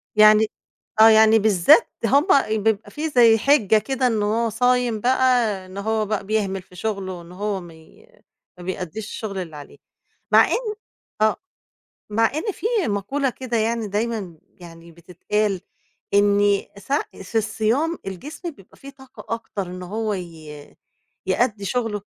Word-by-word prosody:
يعني 215 0 +6 0.5
آه، 225 - +9
يعني 220 0 +6
بالذات 215 - +4 0.2
هُم 285 +3 +3 0.4
بيبقى 220 -1 0
فيه 310 +1 -3
زي 235 -6 +5
حِجة 220 -5 +3
كده 255 +4 0
إن 220 -3 0
هو 225 +2 0
صايم 245 0 +1
بقى 260 +3 +1 0.4
إن 185 +1 -12
هو 215 +1 -1
بقى 205 -1 -3
بيهمل 195 -3 -1
في 180 0 -20
شغله 190 -2 -4
إن 170 +1 -14
هو 200 0 -3
مي 165 - -16 0.5
ما 180 - -11
بيأديش 185 +3 -5
الشغل 210 -3 -6
اللي 165 -4 -7
عليه. 145 -1 -11 0.6
مع - - +7
إن 450 -3 -2 0.5
آه، 215 -1 +3 0.8
مع 225 +2 +2
إن 355 +7 -2
فيه 440 -2 -1
مقولة 250 +7 -1
كده 245 -1 -4
يعني 225 0 0
دايمًا 205 -5 -3
يعني 170 -1 -14
بتتقال 180 +4 -2 0.5
إني 205 0 +3
س 235 +8 -8 0.3
في 225 +4 -1
الصيام 235 +10 0
الجسم 295 - -7
بيبقى 195 - -19
فيه 275 - -11
طاقة 265 -3 -8
أكتر 210 -4 -6
إن 180 +1 -8
هو 215 +3 -3
ي 155 -5 -10 0.5
يأدّي 215 -5 0
شغله 225 -2 -2
215 Hz, 145 wpm, -22 LUFS, 190-235 Hz, 0.8 s, آه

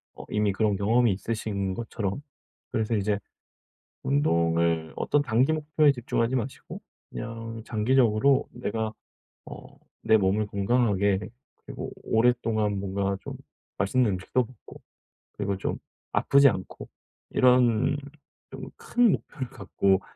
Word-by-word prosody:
어 - - -10
이미 105 -1 +1
그런 105 0 +1
경험이 115 +2 +3
있으신 100 -2 -3
것처럼 115 0 -4 0.5
그래서 110 0 0
이제 100 0 0 0.8
운동을 85 - +1
어떤 145 - +1
단기 130 +4 +2
목표에 155 -1 +3
집중하지 120 -1 -1
마시고 125 +3 -6 0.3
그냥 115 0 -6
장기적으로 120 +3 +3
내가 110 -2 -3 0.6
어 - - -11 0.3
내 110 - +7
몸을 100 +2 +1
건강하게 100 -2 +1 0.5
그리고 - - -6
오랫동안 110 -3 +1
뭔가 100 0 -1
좀 - - -7 0.4
맛있는 105 +3 +2
음식도 95 +7 0
먹고 120 -2 -15 0.5
그리고 100 -1 -2
좀 - - -3 0.3
아프지 140 0 +5
않고 95 -4 -6 0.4
이런 125 +1 +4 0.5
좀 - - -8
큰 240 -4 +3
목표를 130 -6 -5
갖고 100 -5 +1
110 Hz, 265 characters per minute, -26 LUFS, 100-125 Hz, 0.8 s, 내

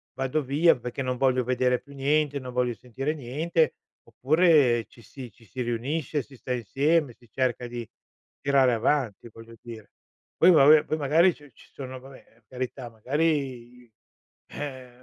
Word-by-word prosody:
vado 135 +3 -1
via 150 +6 +3
perché 125 +2 -6
non 125 -1 -2
voglio 130 -1 +2
vedere 125 0 +1
più 140 - -17
niente, 145 +1 0
non 125 -1 -8
voglio 125 -1 0
sentire 130 +5 -4
niente." 155 +4 -1 0.3
Oppure 145 -6 +3
ci 115 - -19
si 125 +1 -11
ci 115 +3 -22
si 125 +5 -7
riunisce, 130 +5 -2
si 135 - -17
sta 125 0 -5
insieme, 140 +5 0
si 120 -1 -24
cerca 125 0 -2
di 120 -1 -7 0.5
tirare 135 -3 +3
avanti, 120 -2 -1
voglio 115 +1 -13
dire. 115 -3 -11 0.5
Poi 180 +2 +6
vabbè 150 -1 +7
poi 155 - -2
magari 160 +5 +3
ci 145 -2 -18
ci - - -20
sono 130 -1 -8
vabbè, 135 +1 -14
per 115 +1 -29
carità, 130 0 -6
magari 130 +8 -2 0.6
i 120 - -26 0.6
eh, 130 -3 -7
130 Hz, 165 wpm, -26 LUFS, 120-145 Hz, 0.6 s, vabbè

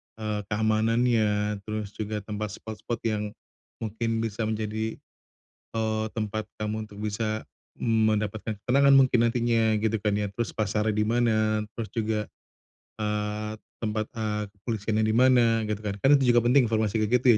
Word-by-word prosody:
eee, 110 -1 -3
keamanannya 110 -1 +2
terus 105 -1 -3
juga 105 -1 -3
tempat 105 0 -4
spot-spot 110 +1 -5
yang, 105 -2 0 0.6
mungkin 115 +1 -1
bisa 110 0 -2
menjadi, 110 0 -2 0.8
eee, 110 0 0
tempat 110 0 -3
kamu 105 +1 -2
untuk 100 - -12
bisa 110 +1 -2 0.3
mendapatkan 110 -1 0
ketenangan 140 +5 +4
mungkin 130 -2 +5
nantinya 115 -2 +2
gitu 110 -1 0
kan 105 -1 +1
ya 105 - 0
terus 120 +2 -2
pasarnya 105 0 0
di 105 0 +1
mana 110 -2 +2 0.2
terus 115 - -2
juga, 110 -2 0 0.8
eee, 105 0 -2 0.3
tempat, 110 -1 -2
eee, 110 -2 -2
kepolisiannya 110 +1 -1
di 110 - +1
mana 120 -2 +5
gitu 105 - -1
kan 105 -2 -3
kan 140 +1 +6
itu 125 -3 +3
juga 120 - +5
penting 125 +2 +4
informasi 110 -1 +1
kayak 115 +3 +2
gitu - - -2
110 Hz, 150 wpm, -27 LUFS, 105-115 Hz, 0.8 s, kan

